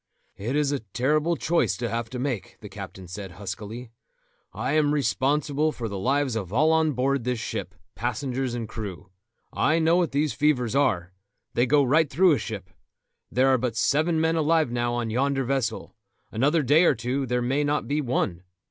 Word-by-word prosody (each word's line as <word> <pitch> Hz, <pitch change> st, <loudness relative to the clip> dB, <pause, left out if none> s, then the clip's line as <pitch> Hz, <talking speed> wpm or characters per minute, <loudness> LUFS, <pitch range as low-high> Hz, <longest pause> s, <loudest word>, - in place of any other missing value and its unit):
"It 115 Hz, +7 st, -3 dB
is 145 Hz, -1 st, +2 dB
a 140 Hz, -, -1 dB
terrible 145 Hz, -, 0 dB
choice 170 Hz, 0 st, +1 dB
to 120 Hz, -, -2 dB
have 115 Hz, 0 st, -3 dB
to 125 Hz, -, -6 dB
make," 125 Hz, -5 st, -3 dB
the -, -, -10 dB
captain 95 Hz, -1 st, -9 dB
said 95 Hz, 0 st, -7 dB
huskily. 105 Hz, +5 st, -7 dB, 0.6 s
"I -, -, -3 dB
am 150 Hz, -1 st, +3 dB
responsible 145 Hz, +3 st, +1 dB
for 120 Hz, -5 st, -5 dB
the 100 Hz, -2 st, -5 dB
lives 135 Hz, +2 st, +1 dB
of 100 Hz, -5 st, -4 dB
all 150 Hz, +8 st, +3 dB
on 160 Hz, -1 st, +3 dB
board 135 Hz, +1 st, 0 dB
this 125 Hz, 0 st, -1 dB
ship, 110 Hz, -, -5 dB, 0.2 s
passengers 125 Hz, +2 st, -2 dB
and 115 Hz, -2 st, -4 dB
crew. 100 Hz, -4 st, -7 dB, 0.4 s
I 155 Hz, -, +2 dB
know 165 Hz, +1 st, +3 dB
what 175 Hz, -3 st, +1 dB
these 145 Hz, +1 st, 0 dB
fevers 135 Hz, -5 st, +1 dB
are; 95 Hz, -10 st, +1 dB, 0.4 s
they 120 Hz, +2 st, +2 dB
go 145 Hz, +2 st, +4 dB
right 150 Hz, +3 st, +3 dB
through 180 Hz, +5 st, +4 dB
a 145 Hz, -, +2 dB
ship. 100 Hz, -4 st, -6 dB, 0.6 s
There 130 Hz, +2 st, +3 dB
are 130 Hz, -1 st, +4 dB
but 120 Hz, -2 st, -2 dB
seven 155 Hz, +7 st, +2 dB
men 160 Hz, +1 st, +2 dB
alive 160 Hz, -3 st, +2 dB
now 120 Hz, 0 st, -1 dB
on 120 Hz, -2 st, -2 dB
yonder 135 Hz, +3 st, +1 dB
vessel; 125 Hz, -3 st, -2 dB, 0.4 s
another 145 Hz, +8 st, +2 dB
day 150 Hz, +7 st, +5 dB
or -, -, +4 dB
two 125 Hz, +4 st, -2 dB
there 125 Hz, 0 st, 0 dB
may 135 Hz, +4 st, +1 dB
not 145 Hz, +1 st, 0 dB
be 145 Hz, +2 st, 0 dB
one. 105 Hz, -9 st, -1 dB
130 Hz, 190 wpm, -25 LUFS, 115-150 Hz, 0.6 s, day